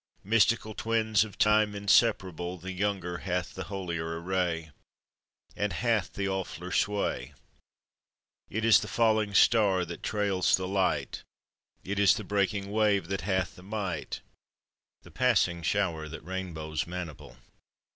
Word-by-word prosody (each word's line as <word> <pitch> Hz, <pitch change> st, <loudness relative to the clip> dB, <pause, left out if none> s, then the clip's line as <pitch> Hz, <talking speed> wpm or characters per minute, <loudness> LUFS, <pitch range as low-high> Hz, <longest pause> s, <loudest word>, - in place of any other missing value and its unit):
Mystical 110 Hz, +1 st, +2 dB
twins 110 Hz, -2 st, +1 dB
of 110 Hz, -2 st, -10 dB
Time 105 Hz, 0 st, +3 dB
inseparable, 95 Hz, -4 st, +2 dB
The 95 Hz, +2 st, -7 dB
younger 95 Hz, -2 st, -2 dB
hath 90 Hz, -1 st, -2 dB
the 95 Hz, -, -6 dB
holier 85 Hz, -4 st, -4 dB
array, 85 Hz, -3 st, -1 dB, 0.8 s
And 105 Hz, 0 st, -1 dB
hath 115 Hz, -4 st, 0 dB
the 100 Hz, -, -2 dB
awfuller 95 Hz, -2 st, -4 dB
sway: 100 Hz, -12 st, -1 dB, 1.1 s
It 110 Hz, +2 st, -2 dB
is 115 Hz, -, +7 dB
the -, -, -5 dB
falling 110 Hz, -3 st, +1 dB
star 100 Hz, -6 st, +4 dB
that 85 Hz, 0 st, -8 dB
trails 100 Hz, -4 st, +2 dB
the 95 Hz, 0 st, -4 dB
light, 95 Hz, 0 st, 0 dB, 0.6 s
It 100 Hz, +1 st, -3 dB
is 100 Hz, -1 st, +6 dB
the 110 Hz, -, -5 dB
breaking 100 Hz, 0 st, -1 dB
wave 105 Hz, -4 st, +2 dB
that 95 Hz, 0 st, -2 dB
hath 95 Hz, -1 st, -1 dB
the -, -, -13 dB
might, 95 Hz, -4 st, -4 dB, 0.8 s
The -, -, -15 dB
passing 105 Hz, -9 st, +2 dB
shower 85 Hz, -3 st, -1 dB
that 80 Hz, 0 st, -9 dB
rainbows 80 Hz, -5 st, -4 dB
maniple. 85 Hz, -9 st, -7 dB
95 Hz, 135 wpm, -29 LUFS, 90-105 Hz, 1.1 s, is